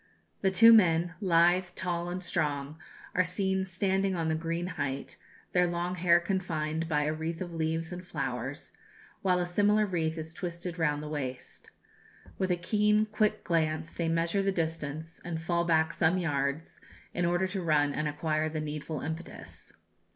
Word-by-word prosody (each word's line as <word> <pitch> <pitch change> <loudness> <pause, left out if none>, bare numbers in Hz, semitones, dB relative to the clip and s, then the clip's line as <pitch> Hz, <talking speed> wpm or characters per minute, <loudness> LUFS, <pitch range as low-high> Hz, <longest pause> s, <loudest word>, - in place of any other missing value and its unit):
The 195 - +3
two 225 +4 +8
men 175 -4 +4
lithe, 175 0 +3
tall, 175 -1 -2
and 180 +1 -4
strong 145 -2 -2 0.3
are 185 - +3
seen 190 +1 0
standing 190 +1 0
on 165 -2 -1
the - - +2
green 165 +2 -2
height, 140 -6 -4 0.4
their 180 -1 +3
long 175 +1 -2
hair 175 -1 +4
confined 165 -3 -2
by 150 -1 +2
a 155 +1 0
wreath 160 +1 -4
of 175 -2 -5
leaves 160 +1 -2
and 180 0 -7
flowers, 135 -3 -4 0.5
while 185 -2 +3
a 180 - 0
similar 205 +4 +3
wreath 165 -4 -1
is 160 0 -6
twisted 170 0 -5
round 150 -2 +1
the - - -5
waist. 130 -4 -6 0.7
With 190 - 0
a 180 - +2
keen, 210 +4 +2
quick 215 -1 +1
glance 160 -1 0
they 170 -1 -2
measure 165 +4 +1
the 195 0 +1
distance, 160 -2 -4
and 170 -2 -4
fall 170 +1 0
back 160 -1 +2
some 170 +2 +2
yards, 145 -2 -2 0.3
in 175 - -1
order 175 +2 +2
to 190 0 -3
run 150 -4 +2
and 155 - -1
acquire 155 +1 -1
the 155 0 -3
needful 150 0 -4
impetus. 160 +3 -7
170 Hz, 170 wpm, -30 LUFS, 155-180 Hz, 0.7 s, two